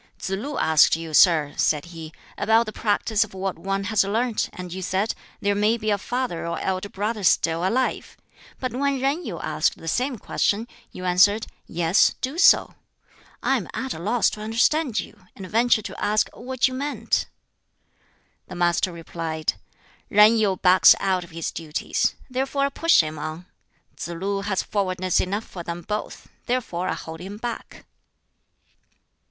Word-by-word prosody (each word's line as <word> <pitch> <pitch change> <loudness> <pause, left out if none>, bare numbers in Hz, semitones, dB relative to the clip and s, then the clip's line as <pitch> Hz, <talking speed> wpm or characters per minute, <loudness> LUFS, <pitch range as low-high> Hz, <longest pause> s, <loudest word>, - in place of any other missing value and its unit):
"Tsz - - -5
lu 255 +9 -3
asked 160 -1 +5
you, 165 -1 -7
sir," 155 -3 +5
said 150 0 +1
he, 160 -1 -8 0.2
"about 225 +3 +3
the 215 - -7
practice 215 0 +1
of 210 -3 -12
what 190 -2 -3
one 195 +2 -2
has 215 +1 +2
learnt, 225 +3 -1
and 180 -1 -8
you 190 - -5
said, 190 +4 0 0.3
'There 205 0 +2
may 210 +3 +2
be 215 -2 -1
a 205 - +2
father 245 -7 -3
or 170 - -3
elder 190 +1 -2
brother 210 +2 -3
still 165 -1 +2
alive'; 245 +8 -1 0.4
but 255 -3 -3
when 280 +2 0
Yen 275 +6 0
Yu - - -5
asked - - 0
the 165 - -11
same 250 - 0
question, 215 +2 -1 0.2
you 185 - -8
answered, 200 +4 +4 0.2
'Yes, 170 +3 +3
do 270 +6 -3
so.' 390 +1 +5 0.7
I - - +3
am - - -5
at 265 0 -3
a - - -8
loss 220 +7 +1
to 210 - -7
understand 230 +4 +1
you, 180 - -9
and 195 - -8
venture 225 +1 +2
to - - -7
ask 210 +1 +1
what 255 +1 0
you 255 - -5
meant." 285 +3 -1 1.2
The 185 - -9
Master 175 +1 +1
replied, 165 -2 -3 0.6
"Yen 210 +2 +6
Yu 205 -4 +1
backs 180 +1 +7
out 190 -2 0
of 170 - -13
his 165 -1 -4
duties; 155 -2 -2
therefore 270 +2 -1
I - - 0
push 330 - +4
him 155 -1 -6
on. 155 +3 -6 0.5
Tsz - - -6
lu 195 +4 -3
has 200 -2 -1
forwardness 185 -3 0
enough 200 +4 -2
for 180 - -8
them 170 0 -6
both; 210 +3 -5 0.2
therefore 235 -8 -2
I - - -1
hold 160 0 -8
him 195 +4 -8
back." 235 +1 -7
200 Hz, 170 wpm, -24 LUFS, 175-230 Hz, 1.2 s, backs